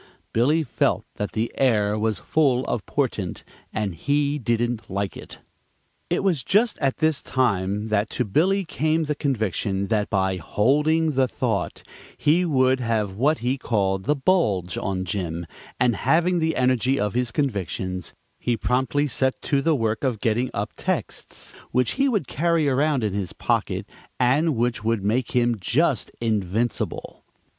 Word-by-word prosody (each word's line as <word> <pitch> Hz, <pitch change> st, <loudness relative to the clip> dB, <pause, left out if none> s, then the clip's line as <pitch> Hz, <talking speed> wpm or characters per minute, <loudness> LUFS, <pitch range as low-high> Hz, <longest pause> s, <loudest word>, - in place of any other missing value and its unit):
Billy 145 Hz, +8 st, +3 dB
felt -, -, 0 dB
that 105 Hz, -, -3 dB
the 110 Hz, +2 st, -1 dB
air 105 Hz, -6 st, +3 dB
was 110 Hz, 0 st, 0 dB
full 135 Hz, -5 st, +1 dB
of 115 Hz, -4 st, -2 dB
portent, 110 Hz, -10 st, -2 dB, 0.3 s
and 105 Hz, -3 st, -2 dB
he 145 Hz, -, 0 dB
didn't 120 Hz, -1 st, -1 dB
like 100 Hz, 0 st, -2 dB
it. -, -, -10 dB, 0.7 s
It -, -, 0 dB
was 175 Hz, -8 st, +2 dB
just 210 Hz, -, +2 dB
at 135 Hz, -3 st, 0 dB
this 155 Hz, -3 st, +1 dB
time 105 Hz, -4 st, 0 dB
that 105 Hz, 0 st, +1 dB
to 125 Hz, -, -1 dB
Billy 185 Hz, -, +2 dB
came 155 Hz, +1 st, 0 dB
the 150 Hz, -1 st, -1 dB
conviction 105 Hz, -, -1 dB
that 105 Hz, -2 st, +1 dB
by 95 Hz, -1 st, +1 dB
"holding 150 Hz, -, +2 dB
the 135 Hz, -2 st, +2 dB
thought" -, -, -2 dB, 0.3 s
he 170 Hz, +5 st, +3 dB
would 130 Hz, -4 st, +3 dB
have 110 Hz, -5 st, -1 dB
what 145 Hz, +8 st, +2 dB
he 130 Hz, +2 st, 0 dB
called 95 Hz, -6 st, 0 dB
"the 150 Hz, -, +2 dB
bulge 120 Hz, -, +1 dB
on 95 Hz, -2 st, -2 dB
Jim," 85 Hz, -2 st, -3 dB, 0.3 s
and 120 Hz, -2 st, +3 dB
having 175 Hz, +2 st, +2 dB
the 160 Hz, 0 st, 0 dB
energy 130 Hz, +1 st, +2 dB
of 105 Hz, -1 st, 0 dB
his 125 Hz, 0 st, 0 dB
convictions, 95 Hz, -, -3 dB, 0.2 s
he 120 Hz, -1 st, 0 dB
promptly 130 Hz, +5 st, +1 dB
set 130 Hz, -1 st, 0 dB
to 140 Hz, -2 st, +1 dB
the 160 Hz, +2 st, +2 dB
work 115 Hz, -2 st, -1 dB
of 125 Hz, -6 st, 0 dB
getting 115 Hz, +4 st, 0 dB
up -, -, -3 dB
texts -, -, -4 dB, 0.2 s
which 125 Hz, -1 st, +1 dB
he 275 Hz, +1 st, +1 dB
could 210 Hz, -, 0 dB
carry 165 Hz, 0 st, +1 dB
around 140 Hz, -1 st, +2 dB
in 105 Hz, -3 st, -1 dB
his 100 Hz, -3 st, -3 dB
pocket -, -, -1 dB, 0.3 s
and 140 Hz, +5 st, +3 dB
which 120 Hz, -2 st, -1 dB
would 115 Hz, -2 st, 0 dB
make 115 Hz, +6 st, 0 dB
him 120 Hz, -2 st, +2 dB
just 135 Hz, -, +1 dB
invincible. 110 Hz, 0 st, -2 dB
125 Hz, 160 wpm, -24 LUFS, 105-145 Hz, 0.7 s, Billy